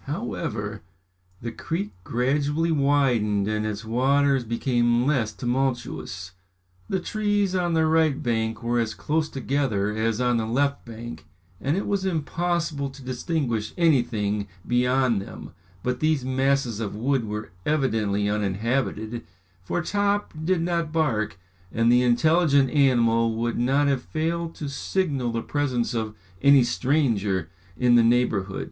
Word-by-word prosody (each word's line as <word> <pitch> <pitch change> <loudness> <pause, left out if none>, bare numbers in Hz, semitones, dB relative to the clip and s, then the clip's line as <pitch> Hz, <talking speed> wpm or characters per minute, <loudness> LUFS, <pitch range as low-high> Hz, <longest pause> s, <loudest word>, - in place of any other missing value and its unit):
However, - - -4 0.6
the 115 - -3
creek 165 - -4
gradually 145 - 0
widened 130 -9 +2
and 110 0 -1
its 110 +1 -5
waters 135 +3 +2
became 120 +1 +1
less 130 -7 +1
tumultuous. 120 -9 -3 0.6
The 190 - 0
trees 205 0 0
on 175 -2 +1
the 160 0 +3
right 160 -3 +3
bank 115 -1 -1
were 120 +1 +1
as 110 -1 -1
close 155 +1 -1
together 125 -7 -1
as 110 0 0
on 125 -1 +2
the 110 -1 -1
left 140 +4 0
bank, 115 -5 -9 0.3
and 145 +6 0
it 200 - -1
was 200 -2 0
impossible 170 -3 -1
to 135 0 -13
distinguish 125 -3 -2
anything 115 - +1 0.2
beyond 125 -2 +2
them, - - -10 0.3
but 125 0 -1
these 155 -4 +1
masses 130 -3 +1
of 105 -3 -3
wood 125 +2 0
were 105 -3 -5
evidently 110 -9 +1
uninhabited, 110 +3 -1 0.4
for 160 - -2
Top 205 +2 0
did 170 0 +1
not 170 -2 -1
bark, 130 -12 0 0.3
and 115 +1 +3
the 125 0 +5
intelligent 140 +2 +3
animal 115 -5 +3
would 120 +1 -1
not 135 +4 +2
have 135 -3 +1
failed 165 +3 -2
to 150 - -5
signal 140 -3 -1
the 115 0 -2
presence 130 -6 -1
of 110 -2 -3 0.3
any 140 -2 +7
stranger 115 - 0 0.3
in 125 -1 +3
the 120 - +7
neighbourhood. 115 -5 +1
125 Hz, 140 wpm, -25 LUFS, 115-150 Hz, 0.6 s, any